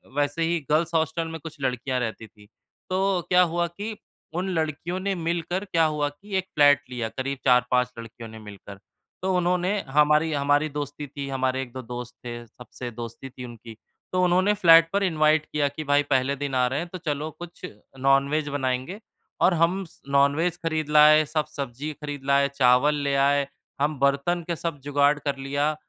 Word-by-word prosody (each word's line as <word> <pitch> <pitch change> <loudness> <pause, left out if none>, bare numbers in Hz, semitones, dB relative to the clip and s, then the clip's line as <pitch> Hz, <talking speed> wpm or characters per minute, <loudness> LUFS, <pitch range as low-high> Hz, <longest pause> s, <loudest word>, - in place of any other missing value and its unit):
वैसे 145 +3 0
ही 170 +1 +1
girls 160 +3 +1
hostel 160 0 0
में 160 0 -6
कुछ 155 -1 -9
लड़कियाँ 130 0 -1
रहती 110 -2 -4
थीं। 105 0 -20 0.4
तो 190 -1 +1
क्या 180 0 +6
हुआ 175 +1 +1
कि 205 +6 -6 0.4
उन 190 +1 -2
लड़कियों 160 +3 -2
ने 195 +1 -1
मिलकर 170 +2 -2
क्या 165 -4 +2
हुआ 150 -1 0
कि 195 +8 -9
एक 190 - 0
फ़्लैट 145 -1 +6
लिया 120 -3 -3
करीब 135 +3 -4
4-5 125 0 +3
लड़कियों 115 0 -9
ने 110 0 -10
मिलकर। 100 -1 -11 0.4
तो 190 +1 0
उन्होंने 180 +3 +1
हमारी 150 +3 +3
हमारी 145 +1 +2
दोस्ती 145 0 -5
थी 140 +1 -6
हमारे 130 -1 0
1-2 130 0 -7
दोस्त 125 0 -7
थे, 120 0 -6
सबसे 125 +1 -9
दोस्ती 115 +3 -8
थी 125 -1 -9
उनकी। 115 -1 -11 0.4
तो 185 0 +1
उन्होंने 185 +3 +3
फ़्लैट 165 -4 +6
पर 200 0 +2
इनवाइट 155 -3 +3
किया 145 -1 0
कि 145 +3 -6
भाई 145 0 +4
पहले 135 -1 +1
दिन 140 -1 -4
आ 125 -1 +3
रहे 135 +3 -1
हैं 170 - -4
तो - - -3
चलो 155 -3 -3
कुछ 175 0 -9 0.3
नॉनवेज 140 +3 +2
बनाएँगे। 130 +6 -2 0.4
और 185 - +5
हम 175 +3 +2
स 165 - -20
नॉनवेज 145 +5 +2
खरीद 160 -2 -1
लाए, 150 0 +7
सब 155 0 -1
सब्ज़ी 140 +2 -5
खरीद 145 -2 -6
लाए, 140 0 +3
चावल 135 +3 +4
ले 140 -1 -1
आए। 140 0 +3 0.3
हम 150 -1 0
बर्तन 140 +6 +1
के 170 - -1
सब 165 -2 -4
जुगाड़ 145 +1 +3
कर 140 -2 -2
लिया। 145 +3 -1
145 Hz, 185 wpm, -25 LUFS, 135-165 Hz, 0.4 s, लाए